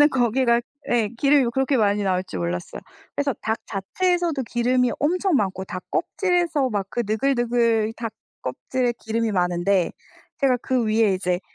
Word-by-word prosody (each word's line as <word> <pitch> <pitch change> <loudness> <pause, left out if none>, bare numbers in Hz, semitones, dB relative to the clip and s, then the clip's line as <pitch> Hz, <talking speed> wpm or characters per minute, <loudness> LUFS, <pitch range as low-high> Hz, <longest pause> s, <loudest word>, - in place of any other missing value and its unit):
저는 295 - +8
거기가 240 -1 +2 0.3
예 230 -3 +2
기름이 275 -2 +4
그렇게 265 +2 +1
많이 205 -2 +2
나올지 185 - -1
몰랐어요. 85 0 -4 0.3
그래서 285 -2 0
닭 220 0 -1
자체에서도 335 - 0
기름이 245 +1 +1
엄청 360 +3 +2
많고 190 -4 -1
닭 185 -1 -6
껍질에서 345 -8 +1
막 200 -3 -1
그 240 - -1
느글느글 230 -1 +1
닭 230 -2 -4 0.3
껍질에 245 - -1
기름이 225 0 -1
많은데 180 0 +1 0.5
제가 265 -3 +4
그 255 -3 +1
위에 215 -2 +3
이제 180 -1 -1
235 Hz, 340 characters per minute, -23 LUFS, 200-270 Hz, 0.5 s, 저는